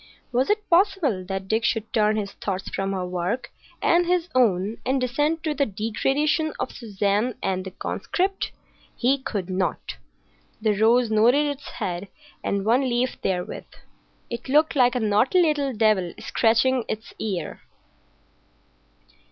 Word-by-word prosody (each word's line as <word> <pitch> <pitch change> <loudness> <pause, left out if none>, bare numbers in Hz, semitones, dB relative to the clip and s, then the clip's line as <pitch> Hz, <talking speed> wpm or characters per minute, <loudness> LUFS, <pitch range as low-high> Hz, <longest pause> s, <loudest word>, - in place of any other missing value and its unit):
Was 255 +2 +1
it 420 0 0
possible 345 - +2
that 195 0 -4
Dick 220 +3 +1
should 225 -1 -1
turn 215 -1 +3
his 205 -2 -2
thoughts 195 -1 -4
from 195 0 -2
her 185 -2 -2
work 180 +7 -3 0.3
and 345 +1 +4
his 355 -1 +1
own 215 -4 +2
and 265 +2 +1
descend 295 +6 0
to 310 -2 0
the 280 -1 +1
degradation 270 - 0
of - - -2
Suzanne 210 +1 -1
and 185 -1 -1
the 190 - -6
conscript? 380 - -2 0.4
He 265 +3 +2
could 205 -8 -4
not! 185 0 -2 0.6
The 215 -1 +2
rose 230 +3 +3
nodded 240 +7 +4
its 285 -1 -4
head 180 +2 -4 0.4
and 200 0 -1
one 240 +4 +4
leaf 255 -1 -1
therewith. 180 -2 -2 0.6
It 235 +2 -6
looked 305 +3 +3
like 250 -2 +4
a - - +1
naughty 220 - +3
little 300 -5 +2
devil 215 -6 +1
scratching 235 +3 +2
its 220 +1 -5
ear. 185 -7 -4
230 Hz, 145 wpm, -24 LUFS, 200-280 Hz, 0.6 s, and